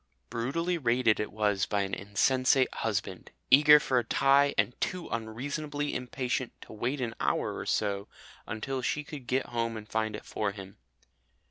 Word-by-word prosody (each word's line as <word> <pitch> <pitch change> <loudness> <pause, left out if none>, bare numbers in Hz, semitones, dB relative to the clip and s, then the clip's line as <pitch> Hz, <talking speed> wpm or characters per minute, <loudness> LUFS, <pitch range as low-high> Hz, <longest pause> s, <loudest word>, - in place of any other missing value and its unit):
Brutally 165 +9 -1
raided 120 -4 +2
it 105 - -2
was 105 -1 +1
by 100 -1 0
an 95 0 -5
insensate 130 +7 +2
husband, 100 -4 -3 0.2
eager 150 +2 +9
for 130 -3 +1
a - - -2
tie 140 +4 +3
and 125 - +2
too 180 -4 -2
unreasonably 145 +6 -3
impatient 125 0 -3
to - - -11
wait 120 +6 -2
an 120 -3 -2
hour - - 0
or - - -6
so 100 -1 0 0.4
until 130 +4 -3
she 150 +4 -1
could 145 -4 -9
get 130 +2 +1
home 115 -1 -2
and 105 -1 -9
find 110 0 -1
it - - -9
for 100 -2 -2
him. 95 -1 -10
120 Hz, 165 wpm, -29 LUFS, 105-135 Hz, 0.4 s, eager